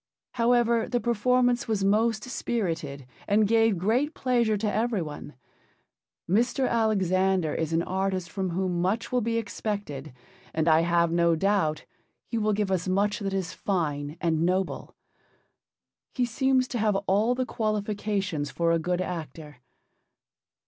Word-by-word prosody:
However, 235 -1 +2
the 245 - +1
performance 245 +1 +1
was 215 -3 0
most 215 +2 +2
spirited 165 - -3 0.2
and 210 +1 +3
gave 225 -2 +3
great 245 - 0
pleasure 235 -4 +1
to 205 0 -1
every 220 -3 0
one. 150 -2 -8 0.9
Mr. 240 +7 +2
Alexander 190 -6 +1
is 160 -1 -2
an 165 +1 +1
artist 190 -1 -2
from 190 -2 -2
whom 180 0 -1
much 195 +6 -1
will 250 -1 +2
be 230 +1 -1
expected, 205 -10 -4 0.4
and 160 0 +1
I 160 0 +5
have 170 0 +2
no 170 0 +3
doubt 185 -4 0 0.4
he 230 - -3
will 215 0 +1
give 205 -1 -1
us 185 -1 0
much 200 +4 +1
that 200 -2 -3
is 190 -2 -2
fine 150 -5 -2
and 165 -2 0
noble. 185 +2 -1 1.2
He 250 - +2
seems 260 +2 +1
to 240 - -3
have 210 -2 +2
all 210 +6 +2
the 255 0 -1
qualifications 205 -7 -2
for 170 -1 0
a 165 - +2
good 180 +2 -1
actor. 155 -5 -6
200 Hz, 145 wpm, -27 LUFS, 170-225 Hz, 1.2 s, I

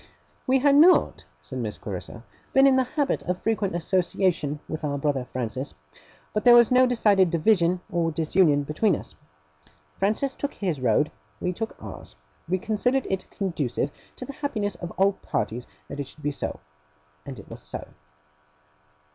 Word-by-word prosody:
'We 260 +1 +4
had 280 +1 +4
not,' 345 +5 +5 0.2
said - - -6
Miss - - -4
Clarissa, - - -7 0.3
'been 270 0 +6
in 270 -1 +6
the 260 - +4
habit 285 +2 -1
of 180 0 -2
frequent 210 -5 -1
association 175 -4 0
with 155 0 -5
our 145 -1 -1
brother 140 -2 0
Francis; 125 - -4 0.6
but 210 - -1
there 240 -1 +8
was 235 -1 +6
no 255 0 +6
decided 205 -6 +3
division 175 +1 +2
or 170 -1 +1
disunion 155 -2 +3
between 155 +9 +1
us. - - -8 0.9
Francis 215 +8 +1
took 285 - -4
his 175 -9 -2
road; 125 +5 +2 0.3
we 180 - -1
took 225 +4 -5
ours. - - -9 0.3
We 185 - +2
considered 230 +6 0
it 190 -1 -3
conducive 145 - -2 0.2
to 255 - -7
the 280 - -7
happiness 215 -9 -2
of 175 0 -7
all 195 +1 +4
parties 120 - -3 0.2
that 140 - -7
it 140 - -3
should 150 - -13
be 145 - 0
so. - - -4 0.6
And - - -8
it - - -12
was - - -9
so. - - -7
185 Hz, 165 wpm, -25 LUFS, 150-235 Hz, 0.9 s, there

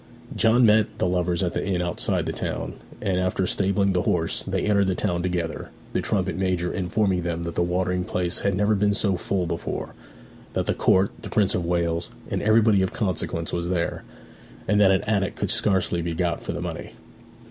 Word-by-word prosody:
John 115 +2 +4
met 105 -1 +3
the - - 0
lovers 90 0 0
at 90 - -1
the - - -2
inn 95 -2 -1
outside 90 -1 -1
the - - -2
town, - - -4 0.3
and 95 -3 +1
after 90 +1 0
stabling 100 +1 +1
the 90 - +2
horse 85 -2 0
they - - -2
entered 100 -2 +3
the 95 - +1
town 85 0 -1
together, 90 -3 -3 0.2
the - - +1
trumpet - - 0
major 90 -1 -1
informing 95 0 0
them 85 -1 -3
that 85 0 -4
the 85 - 0
watering 90 +1 0
place 90 -3 -1
had 100 -2 0
never 105 +2 +2
been 100 0 +2
so 100 -2 +1
full 90 0 -1
before, 85 0 -4 0.6
that - - 0
the - - +1
Court, 95 +1 +3
the - - -7
Prince 100 -3 +2
of 90 - -1
Wales, 85 -1 0 0.2
and - - -1
everybody 110 -2 +4
of 95 - 0
consequence 90 -5 -2
was 85 0 -1
there, 90 -2 -1 0.6
and 105 +1 +3
that 100 - +6
an 95 0 +3
attic 100 -3 0
could - - -1
scarcely 95 -3 +1
be 85 0 -3
got 85 0 -1
for - - -4
money. - - -5
90 Hz, 200 wpm, -24 LUFS, 85-100 Hz, 0.6 s, that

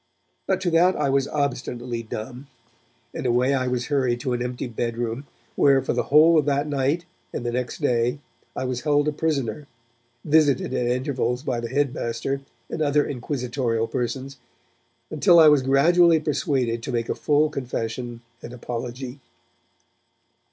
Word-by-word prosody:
but 190 -1 +1
to 185 -2 -1
that 175 +3 +4
I 140 -2 0
was 135 0 +1
obstinately 125 -4 -3
dumb; 115 +4 -7 0.7
and - - -3
away 125 +3 +2
I 130 -2 0
was 125 -1 -1
hurried 130 -4 0
to 125 - -1
an 120 - -2
empty 125 0 -3
bed 115 -1 -3
room, 120 +4 -3 0.3
where 135 -1 +5
for - - -2
the - - -1
whole 155 +3 +6
of 150 - 0
that 145 0 +1
night 145 +4 0 0.3
and 120 - -5
the 120 - -1
next 125 +4 -3
day 120 -1 +1 0.4
I 130 - -3
was 125 -1 -3
held 145 -1 +2
a - - +2
prisoner, 145 -2 -2 0.6
visited 145 -4 +3
at 125 -2 0
intervals 125 0 -1
by 120 -5 -2
the 120 0 -5
headmaster 135 -1 -1 0.3
and 160 - -5
other 145 0 +2
inquisitorial 125 -3 -2
persons, 130 +3 -4 0.7
until 170 +3 +5
I 160 -2 +9
was 150 -2 +5
gradually 160 +5 +4
persuaded 135 -6 -1
to 130 - -5
make 115 -2 -1
a - - 0
full 150 +1 +1
confession 120 -3 -4 0.2
and 120 - -9
apology. 125 +2 -6
130 Hz, 160 wpm, -24 LUFS, 120-145 Hz, 0.7 s, I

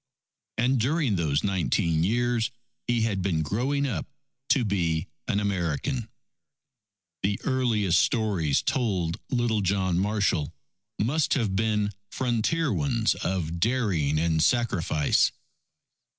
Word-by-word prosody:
And 125 +2 +2
during 135 -1 +1
those 75 -5 0
nineteen 85 -4 +1
years 120 +3 +1 0.4
he 120 -1 +1
had 100 -4 0
been 85 -4 0
growing 130 - 0
up 130 - -3 0.4
to 130 -4 +3
be 85 -6 0 0.2
an 105 -3 +1
American. 100 - -1 1.1
The 100 +1 0
earliest 115 -9 +2
stories 95 - +1
told 95 -10 0
little 120 -4 +1
John 95 -2 +1
Marshall 100 -7 0 0.5
must 140 +8 +1
have 110 -7 0
been 105 -1 +1 0.2
frontier 130 +8 0
ones 120 -6 +1
of 85 -2 -3
daring 95 - +1
and 80 0 +1
sacrifice. 90 - +2
105 Hz, 110 wpm, -26 LUFS, 85-120 Hz, 1.1 s, to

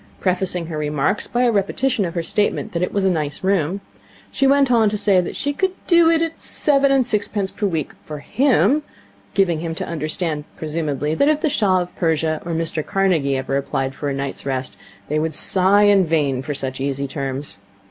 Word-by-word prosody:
Prefacing 180 -2 -1
her 160 -2 -5
remarks 150 +5 0
by 245 +1 0
a 245 - +4
repetition 215 +3 0
of 170 - -5
her 170 - -1
statement 205 +5 -1
that 170 - -2
it 180 - 0
was 200 - 0
a - - +4
nice 150 -2 -3
room, 190 -1 0 0.5
she 275 - +2
went 275 -1 +4
on 225 -3 +4
to 210 - -2
say 200 -3 +3
that 175 - -6
she 285 - -2
could 380 +5 0
'do' 340 -2 +5
it 330 0 +3
at 325 0 -4
seven 275 -2 +2
and 270 -2 +3
sixpence 205 -3 -1
per 210 - -1
week 160 -6 -2
'for 150 - -7
him' 270 - +2 0.5
giving 175 -5 +2
him 165 0 -4
to - - -4
understand, 155 -1 -3
presumably, 150 -2 -2
that, 280 - +2
if 305 0 +1
the 310 -4 +1
Shah 190 -9 +2
of 175 0 -7
Persia 160 -2 0
or 170 - -4
Mr 160 -1 -2
Carnegie 165 -9 +1
ever 130 +1 -2
applied 135 -1 -2
for 145 +1 -4
a - - -2
night's 140 0 -4
rest, 130 -1 -3 0.3
they 150 +1 0
would 160 -1 -2
sigh 195 +4 +3
in 205 -2 +5
vain 150 -6 0
for 145 +2 -4
such 130 -1 -4
easy 140 0 -2
terms. 135 -3 -4
170 Hz, 210 wpm, -20 LUFS, 150-210 Hz, 0.5 s, do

